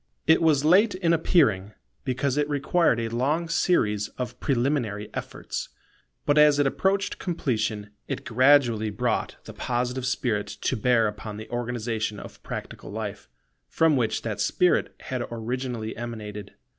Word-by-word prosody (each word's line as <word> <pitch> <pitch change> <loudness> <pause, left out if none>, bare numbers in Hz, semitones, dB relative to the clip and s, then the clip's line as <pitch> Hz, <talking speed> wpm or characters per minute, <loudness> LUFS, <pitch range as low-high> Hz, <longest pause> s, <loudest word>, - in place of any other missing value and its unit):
It 160 +1 +5
was 150 -3 +3
late 195 +6 +5
in 170 -3 +2
appearing, 110 - +2 0.3
because 130 +1 -1
it 150 0 0
required 145 -2 +2
a 115 -1 -2
long 150 +7 0
series 105 - +1
of 125 -3 -5
preliminary 120 -6 -1
efforts: - - -5 0.6
but 145 +1 +4
as 150 -1 +6
it 145 - +3
approached 190 +8 0
completion, 110 - -2 0.2
it - - -4
gradually 125 -3 +4
brought 120 +2 -1
the - - -10
Positive 125 +1 -2
spirit 110 -5 -1
to - - -2
bear 115 -1 +3
upon 105 0 -6
the 110 - -8
organization 115 -3 -2
of - - -11
practical - - -7
life, - - -6 0.4
from 160 -2 +3
which 115 -4 0
that 110 -3 -3
spirit 180 -1 +2
had 125 -2 -4
originally 120 -1 -4
emanated. 105 -3 -7
125 Hz, 145 wpm, -26 LUFS, 110-150 Hz, 0.6 s, as